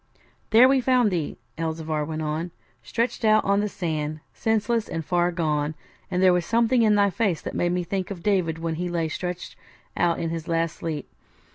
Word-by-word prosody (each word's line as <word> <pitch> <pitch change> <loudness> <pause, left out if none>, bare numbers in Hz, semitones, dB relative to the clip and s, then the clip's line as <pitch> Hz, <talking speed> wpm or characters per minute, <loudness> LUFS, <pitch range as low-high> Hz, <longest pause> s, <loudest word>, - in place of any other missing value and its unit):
'There 235 +3 +7
we 265 0 +3
found 250 -4 +3
thee,' 165 -5 -2 0.2
Elzevir 160 -1 -2
went 155 +1 -4
on, 155 +3 -2 0.3
'stretched 230 - -2
out 215 0 +4
on 200 +1 +3
the 210 0 0
sand, 155 -5 -3
senseless 225 +1 0
and 165 -1 -4
far 175 -1 +2
gone; 155 -3 -1 0.3
and 185 0 0
there 185 -1 +6
was 180 -1 +1
something 235 +5 +2
in 215 -2 +4
thy 200 -1 +3
face 195 -6 0
that - - -6
made 175 - +1
me 180 0 0
think 185 +1 -3
of 180 -4 -7
David 180 -6 +1
when 165 0 -2
he 180 - -2
lay 170 -2 0
stretched 180 +3 -5 0.4
out 170 -1 +2
in 165 -1 -2
his 165 -1 -5
last 165 0 0
sleep. 155 -4 -4
175 Hz, 195 wpm, -25 LUFS, 160-205 Hz, 0.4 s, There